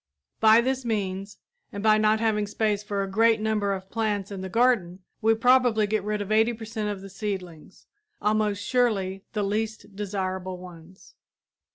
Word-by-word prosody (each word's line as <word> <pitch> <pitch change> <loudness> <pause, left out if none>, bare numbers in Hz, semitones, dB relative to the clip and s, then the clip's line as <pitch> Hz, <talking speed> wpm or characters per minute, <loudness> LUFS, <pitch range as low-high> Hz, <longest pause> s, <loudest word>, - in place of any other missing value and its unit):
By 220 +1 +6
this 260 +1 -1
means, 200 -3 -3 0.3
and 200 0 -6
by 215 0 +5
not 215 0 +3
having 215 -2 +1
space 210 -1 0
for 205 -1 -2
a - - -4
great 225 +3 +3
number 215 -2 0
of 190 -1 -5
plants 210 -3 -1
in 195 -2 -5
the 190 - -5
garden, 195 -6 +1 0.2
we 225 0 +4
probably 245 -2 +4
get 215 0 -1
rid 210 0 -2
of 205 - -8
80 220 +2 +3
per 220 0 -8
cent 215 -1 -3
of 200 -2 -5
the 195 - -9
seedlings 190 -4 -6 0.3
almost 210 -1 0
surely 195 -7 0
the 210 -2 -1
least 215 0 -3
desirable 190 -2 -3
ones. 180 0 -14
210 Hz, 175 wpm, -26 LUFS, 195-220 Hz, 0.3 s, By